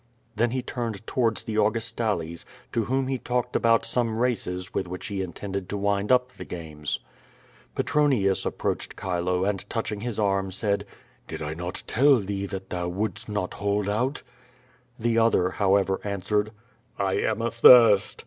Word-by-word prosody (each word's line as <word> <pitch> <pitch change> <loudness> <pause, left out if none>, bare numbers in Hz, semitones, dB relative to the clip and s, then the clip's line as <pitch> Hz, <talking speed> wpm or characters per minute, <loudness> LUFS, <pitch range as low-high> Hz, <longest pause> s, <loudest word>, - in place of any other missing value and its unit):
Then 120 +3 +2
he 130 +1 -2
turned 115 -4 -4
towards 115 -5 +1
the 110 -1 -4
Augustales, 110 -6 0 0.3
to 115 -2 0
»vhom 130 +4 0
he 130 -1 -1
talked 125 0 -2
about 115 -1 +3
some 115 -3 0
races 105 -6 -1
with 95 - -1
which 90 +1 -6
he 100 -2 -3
intended 95 +1 -5
to 105 - -2
wind 100 +2 0
up 125 0 +3
the - - -9
games. 75 -4 -5 0.7
Petronius 130 -11 +2
approached - - -3
Chile, 90 0 0
and 100 -2 -3
touching 105 -3 -3
his 120 -2 -4
arm, 100 -2 +1
said: 100 +2 -1 0.4
"Did - - -6
I 75 0 -3
not 90 +2 -5
tell 140 +5 +5
thee 100 -1 -3
that 95 0 -7
thou 90 -1 -2
wouldst 100 +5 -3
not 105 -3 -2
hold 100 0 -1
out?" 125 +8 -1 0.7
The 115 0 +1
other, 105 -5 +3
however, 95 -1 +2
answered: 105 +1 -1 0.5
"I 95 -1 0
am 110 +2 0
athirst." 115 -3 +6
105 Hz, 160 wpm, -26 LUFS, 95-115 Hz, 0.7 s, athirst